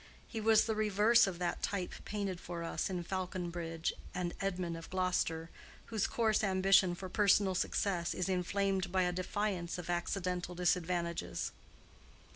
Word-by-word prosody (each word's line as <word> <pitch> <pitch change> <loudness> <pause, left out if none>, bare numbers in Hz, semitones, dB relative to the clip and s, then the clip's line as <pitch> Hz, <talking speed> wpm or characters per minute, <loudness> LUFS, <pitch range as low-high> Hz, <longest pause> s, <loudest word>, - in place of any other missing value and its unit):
He 225 - -4
was 220 0 +5
the 225 - 0
reverse 215 +1 +4
of 185 -3 -3
that 175 -1 -2
type 190 -3 -2
painted 200 -4 -3
for 170 -1 -5
us 165 - -2
in 180 -2 -2
Faulconbridge 175 -3 -3 0.2
and 180 -1 -2
Edmund 180 -3 -1
of 165 - -9
Gloster, 180 -3 0 0.4
whose 215 -3 +1
coarse 220 -2 +2
ambition 190 -2 +4
for 185 +1 -6
personal 200 0 +3
success 180 -1 0
is 180 - -1
inflamed 190 0 0
by 185 0 +3
a 180 - +1
defiance 185 -1 -2
of 175 -1 -4
accidental 180 0 -2
disadvantages. 175 -1 -1
185 Hz, 145 wpm, -34 LUFS, 175-195 Hz, 0.4 s, was